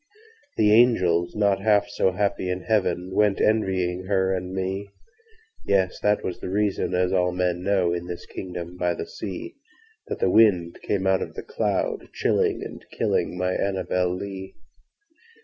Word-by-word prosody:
The 105 0 +4
angels, 90 -8 +3
not 100 -2 +2
half 105 -1 +3
so 95 - +1
happy 100 -1 -1
in 90 0 -2
heaven, 95 -4 0
Went 105 -1 +2
envying 95 -4 +1
her 95 -1 +1
and 90 0 -3
me—Yes!—that 100 - -2
was 90 - -4
the - - -5
reason 100 -2 0
(as 90 +1 +1
all 90 -1 +2
men 90 -1 -1
know, 95 -2 +1
In 85 0 -4
this 85 -1 -6
kingdom 90 -1 -7
by 90 -1 0
the - - -5
sea)That 365 - -9
the 95 - +1
wind 90 -6 +4
came 95 -2 -1
out 95 0 +3
of - - -5
the - - -6
cloud - - -1
by - - -17
night, - - -25
Chilling - - +1
and - - -8
killing 90 - 0
my 90 0 0
ANNABEL 95 -2 0
LEE. 95 0 -7
95 Hz, 160 wpm, -24 LUFS, 90-105 Hz, -, The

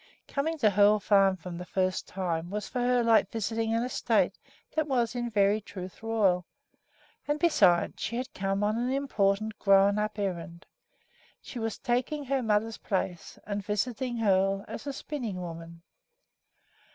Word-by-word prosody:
Coming 320 +3 -1
to 220 -8 +3
Hoel 205 +2 +5
Farm 195 -2 +4
for 180 +1 -8
the 175 +1 -6
first 185 0 -1
time 175 -3 -3
was 210 +2 -4
for 250 - -4
her 245 0 +2
like 230 -1 +4
visiting 225 0 -1
an 230 - +1
estate 250 - +1 0.4
that 315 -1 +1
was, 245 -5 +1
in 240 -1 -2
very 205 0 +2
truth, 185 -2 -9
royal; 200 -6 +1 0.8
and 295 0 +1
besides, 180 - +3
she 235 - -2
had 255 +2 -4
come 195 +1 -1
on 215 +2 +1
an 245 +1 0
important 215 -6 0
"grown 195 +1 +4
up" 215 0 -2
errand. 175 -2 -4 0.7
She 245 - -8
was 225 -1 -3
taking 260 +4 -1
her 270 0 0
mother's 220 0 0
place 185 -3 -3
and 205 0 -3
visiting 240 +4 -2
Hoel 195 -2 +2
as 260 - -7
a - - -1
spinning 250 -10 -5
woman. 170 -1 -8
210 Hz, 160 wpm, -29 LUFS, 195-240 Hz, 0.8 s, Hoel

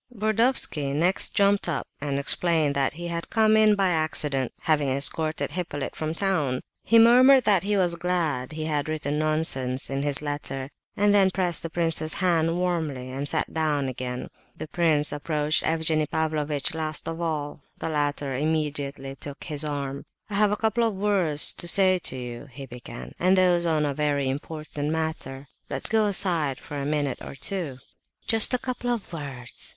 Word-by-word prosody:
Burdovsky 215 - +1
next 175 +5 +1
jumped 200 -2 +3
up 155 - -2 0.2
and 140 -1 -2
explained 155 +1 +1
that 140 -1 0
he 175 +2 -6
had 170 0 -4
come 220 -1 +3
in 215 -1 +5
by 195 -2 +2
accident, 150 -5 0
having 150 -3 +2
escorted 155 +4 +1
Hippolyte 150 -4 -4
from 155 +1 -3
town. 150 -10 0 0.2
He 230 - +4
murmured 255 +3 +7
that 200 -5 +3
he 205 +2 0
was 180 -3 +2
glad 165 -6 -1
he 155 0 -4
had 150 -1 -1
"written 150 -1 -2
nonsense" 140 -5 0
in 135 0 -1
his 145 0 0
letter, 145 -2 -4 0.3
and 205 0 +3
then 195 -2 +5
pressed 180 -3 -1
the 165 - -5
prince's 165 -2 +1
hand 170 -2 +2
warmly 160 -8 -2
and 140 +2 -4
sat - - -1
down 150 -3 0
again. 125 -1 -5 0.3
The - - -6
prince 155 -3 +3
approached 150 +1 0
Evgenie 160 -1 +1
Pavlovitch 150 -3 -1
last 155 -1 -2
of 165 +1 -4
all. 150 -3 -3 0.2
The - - -4
latter 145 -3 -1
immediately 145 -2 -2
took 140 +1 -8
his 150 -3 -1
arm. 140 -2 -4 0.3
"I - - -5
have 210 +1 +4
a 210 - -1
couple 225 +2 +1
of 225 -3 0
words 190 -7 +2
to 175 - -5
say 185 0 +5
to 130 - -2
you," 120 +2 -7
he 135 +2 -9
began, 120 -2 -9
"and 185 +2 +3
those 175 -2 +3
on 155 -2 +1
a 145 - -1
very 145 -2 0
important 150 +1 -4
matter; 155 -4 -3 0.2
let's - - -1
go 220 -1 +3
aside 170 -9 0
for 145 - -8
a 140 0 -3
minute 145 -3 -1
or - - -8
two." 145 0 -3 0.5
"Just 225 -1 +4
a - - +2
couple 245 -1 -4
of 230 -7 -3
words!" 135 -6 -7
155 Hz, 175 wpm, -25 LUFS, 140-180 Hz, 0.5 s, murmured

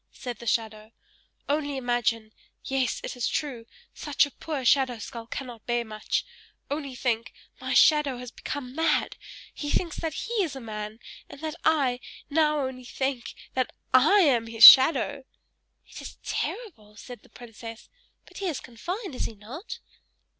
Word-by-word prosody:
said 245 -4 -7
the 235 - -9
shadow. 220 -1 -2 0.6
"Only 285 -1 -1
imagine 240 -3 -1 0.3
yes, 265 -2 -1
it - - -5
is 245 - -1
true, 250 -6 -3 0.3
such 290 -1 +1
a 285 - -10
poor 295 -4 -5
shadow 260 -2 +3
skull 225 +1 -8
cannot 245 -3 -7
bear 240 -1 0
much 215 -1 -2 0.5
only 285 -3 -4
think, 230 -2 -1 0.3
my - - -2
shadow 300 -4 +5
has 250 -1 -8
become 255 -1 -6
mad; 325 +3 +1 0.4
he 290 - -5
thinks 335 +1 -1
that 320 -3 -3
he 470 - -5
is 320 -7 -2
a - - -6
man, 215 -2 -6 0.3
and - - -11
that 315 -1 -3
I 275 -6 +2 0.3
now 300 -2 +2
only 255 -1 -6
think 265 0 -3 0.2
that 255 -1 -1 0.2
I 310 +11 +6
am 245 -9 +3
his 225 0 0
shadow!" 270 +1 +9 0.6
"It - - -10
is - - -9
terrible!" 225 - -5
said 245 +3 -11
the - - -22
princess; 230 -1 -11 0.4
"but - - -15
he 390 - -2
is 315 -6 -2
confined, 355 - -6
is 250 - -3
he 225 - -6
not?" 285 - -8
255 Hz, 160 wpm, -26 LUFS, 230-295 Hz, 0.6 s, shadow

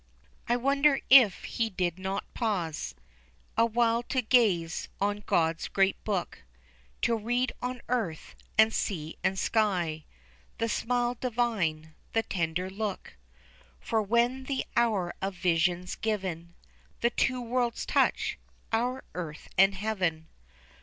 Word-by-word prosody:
I 240 - +3
wonder 275 +2 +3
if 245 -8 +7
he 230 -1 -1
did 180 -3 -2
not 190 +1 -2
pause 180 - -2 0.6
Awhile 230 0 +3
to 260 -2 +1
gaze 200 -9 +2
on 205 +1 0
God's 165 0 +1
great 195 0 +1
book, 195 -5 -2 0.6
To 235 - +3
read 245 +3 0
on 250 0 -4
earth, 220 -11 -2 0.2
and 220 +1 +6
sea, 160 -6 -2
and 190 - +1
sky, 180 -9 0 0.5
The 230 - 0
smile 245 +2 0
divine, 210 -11 -1 0.2
the 225 - +2
tender 175 -1 -2
look; 200 +1 -5 0.6
For 225 -1 0
when 235 +5 +1
the 270 0 -2
hour 210 -7 +2
of 195 0 -2
vision's 175 +1 +1
given, 185 -6 -3 0.5
The 235 - +3
two 255 +1 +1
worlds 240 0 -1
touch - - +1 0.3
our 245 +3 0
earth 160 -4 -6
and 195 +1 +5
heaven. 185 -6 -2
210 Hz, 125 wpm, -29 LUFS, 180-240 Hz, 0.6 s, if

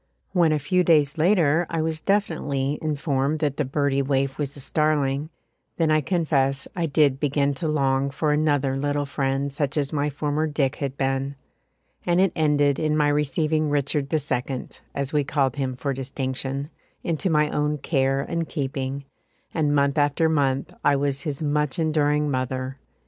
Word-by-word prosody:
When 170 -4 +3
a 155 - +2
few 180 +6 +1
days 155 -2 +3
later 170 -2 +3
I 165 -1 -1
was 160 -1 -2
definitely 150 -8 0
informed 145 -1 0
that 150 -3 -1
the 150 - +1
birdie 140 0 0
waif 135 0 0
was 145 -1 -3
a - - -9
starling, 145 0 0 0.5
then 160 -2 +2
I 155 0 +4
confess 140 -5 0
I 170 -3 0
did 140 -3 +3
begin 145 -1 +1
to 165 - 0
long 135 -2 +1
for 150 +2 0
another 145 -3 +1
little 145 +1 -1
friend 135 0 -1
such 140 0 -1
as 145 -1 -1
my 145 0 0
former 150 +2 -1
"Dick" 145 -3 0
had 140 -1 -4
been, 135 +1 -1 0.7
and 175 0 +2
it 190 -1 +4
ended 145 -3 +2
in 155 -1 +1
my 150 -1 +3
receiving 150 +1 +1
Richard 145 0 0
the 160 - +2
Second, 130 -2 -3 0.2
as 140 0 -3
we 150 -1 +3
called 135 -2 0
him 130 -2 -2
for 135 +2 -2
distinction, 135 +2 -4 0.3
into 170 +3 -1
my 150 -2 +2
own 150 0 0
care 135 -2 +1
and 165 +3 -3
keeping, 135 -2 -3 0.5
and 150 -3 +1
month 140 +1 +2
after 145 +3 +2
month 140 -4 0
I 145 - +4
was 140 0 0
his 145 0 -4
much 150 -1 0
enduring 150 -2 +1
mother. 130 +1 -3
145 Hz, 170 wpm, -24 LUFS, 135-155 Hz, 0.7 s, I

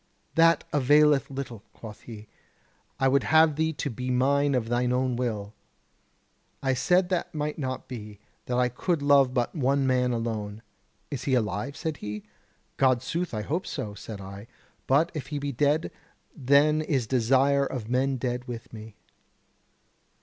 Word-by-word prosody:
'That 165 -1 +4
availeth 145 +1 +4
little,' 130 -5 -6
quoth 110 -2 -11
he; 110 -2 -10 0.7
'I 135 - +3
would 135 +1 +3
have 160 -1 +5
thee 160 +1 +1
be 130 -4 -4
mine 140 +3 +2
of 115 -3 0
thine 120 +1 0
own 125 0 +1
will.' 110 -4 -3 1.1
I 135 -1 +2
said 180 +8 +2
that 180 -3 -2
might 150 +1 -3
not 130 -2 -4
be, 105 -5 -8 0.3
that 125 - -1
I 125 0 +3
could 145 +6 -2
love 140 -2 +5
but 120 -2 -1
one 140 -2 +1
man 125 -1 +2
alone. 110 -2 -3 0.5
'Is 135 -3 -4
he 130 - +2
alive?' 115 +4 -2
said 160 -3 -3
he. 105 0 -6 0.6
'Goodsooth, 135 +7 +1
I 110 -2 -3
hope 170 - -2
so,' 105 -1 -4
said 105 0 -8
I, 100 +2 -9 0.4
'but 150 +6 +3
if 150 - -5
he 150 - -4
be 145 0 -3
dead, 145 +4 +1 0.4
then 145 +2 +3
is 140 -6 0
desire 135 +4 +2
of 120 -5 -5
men 130 +2 +1
dead 125 0 -3
within 115 -2 -7
me.' 110 -1 -11
130 Hz, 155 wpm, -27 LUFS, 120-145 Hz, 1.1 s, have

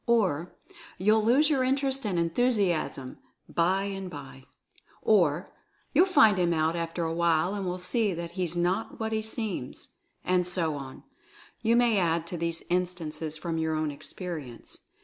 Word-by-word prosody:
Or, 185 -8 +1 0.4
"You'll 215 +3 +3
lose 275 +7 +4
your 270 -3 +2
interest 270 -1 +1
and 185 -4 -1
enthusiasm, 170 - 0 0.3
bye 185 +3 +1
and 195 -2 -4
bye." 135 -4 -10 0.6
Or, 175 -5 +2 0.4
"You'll 370 - +5
find 220 - +5
him 170 -1 +2
out 160 +1 +1
after 170 0 -3
a 165 0 -1
while 170 +1 +2
and 200 -2 -3
will 180 0 -2
see 205 +4 0
that 170 0 -5
he's 175 -2 -3
not 180 +5 -1
what 220 0 -2
he 220 0 0
seems." 215 - -5 0.4
And 180 -1 +2
so 170 -4 +1
on 135 -2 -8 0.3
— - - -24
you 230 0 +3
may 235 -4 +4
add 165 -2 +1
to 175 +1 -5
these 170 0 -1
instances 165 -4 -2
from 165 0 -3
your 160 0 0
own 155 -1 -1
experience. 145 -4 -7
180 Hz, 165 wpm, -28 LUFS, 165-215 Hz, 0.6 s, You'll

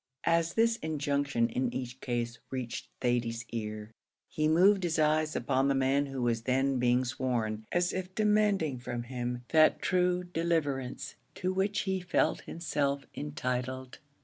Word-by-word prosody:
As 165 0 +2
this 230 0 +3
injunction 140 - 0
in 125 +1 -1
each 125 +1 -5
case 120 -1 -2
reached 130 -3 -4
Thady's 120 -1 0
ear, 110 -1 -5 0.4
he 155 0 0
moved 190 +5 +5
his 170 -3 0
eyes 155 0 +2
upon 135 0 +1
the 140 - +2
man 135 +2 +2
who 135 -2 -4
was 115 -1 +1
then 130 +2 +1
being 125 +1 +3
sworn, 120 -4 -2
as 175 0 +1
if 185 0 -4
demanding 210 - +2
from 120 -1 -4
him 125 0 -4
that 155 -1 +5
true 180 -1 +1
deliverance 145 -6 -2 0.2
to 185 +1 -1
which 200 +2 +1
he 190 -1 -1
felt 180 0 +1
himself 140 -4 -1
entitled. 130 -3 -4
140 Hz, 150 wpm, -30 LUFS, 125-170 Hz, 0.4 s, moved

